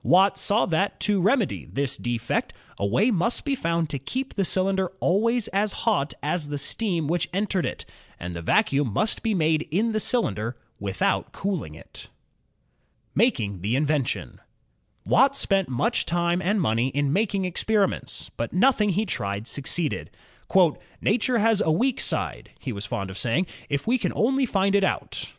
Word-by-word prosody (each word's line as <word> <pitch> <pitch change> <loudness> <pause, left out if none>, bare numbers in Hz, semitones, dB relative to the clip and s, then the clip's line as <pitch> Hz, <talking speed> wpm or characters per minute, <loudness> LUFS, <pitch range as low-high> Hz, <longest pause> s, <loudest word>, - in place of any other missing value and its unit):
Watt 195 +2 +4
saw 210 +3 +2
that, 185 +4 0
to 205 -2 +2
remedy 215 +2 +1
this 140 -1 -2
defect, 120 -1 -2 0.2
a 100 - 0
way 195 - +3
must 225 - 0
be 285 - +1
found 170 -8 0
to 140 - -3
keep 260 - -4
the 195 - 0
cylinder 190 0 +1
always 230 +5 +2
as 200 +1 0
hot 180 -11 +1
as 150 +1 -1
the 145 0 -3
steam 170 +3 -1
which 170 +1 0
entered 195 -1 0
it, - - -6 0.3
and 90 0 -5
the 85 - -5
vacuum 135 - +2
must 215 - +1
be 220 -2 0
made 160 -2 +2
in 210 +9 +1
the 215 - 0
cylinder, 120 - 0 0.2
without 95 -1 -1
cooling 175 - -3
it. - - -12 1.1
Making 110 - +1
the 105 +6 0
Invention 145 -2 -1 0.6
Watt 275 +2 +4
spent 195 -7 +1
much 230 - 0
time 175 +1 +1
and 200 +3 +1
money 115 -6 +1
in 140 +1 0
making 200 0 +1
experi 195 +3 +2
ments, - - -7
but 115 - -2
nothing 210 +2 +3
he 200 +4 +1
tried 100 - -3
succeeded. 145 +5 -3 0.9
"Nature 240 +3 +1
has 220 -1 +3
a 160 - +2
weak 245 +10 +1
side," - - -2
he 130 - -4
was 100 0 -5
fond 100 -1 -3
of 95 - -7
saying, 125 +10 +1 0.2
'4f 140 -1 -1
we 250 +3 +2
can - - -1
only 265 +3 +2
find 195 -2 +1
it 200 -1 +4
out." - - -2
180 Hz, 170 wpm, -25 LUFS, 140-215 Hz, 1.1 s, Watt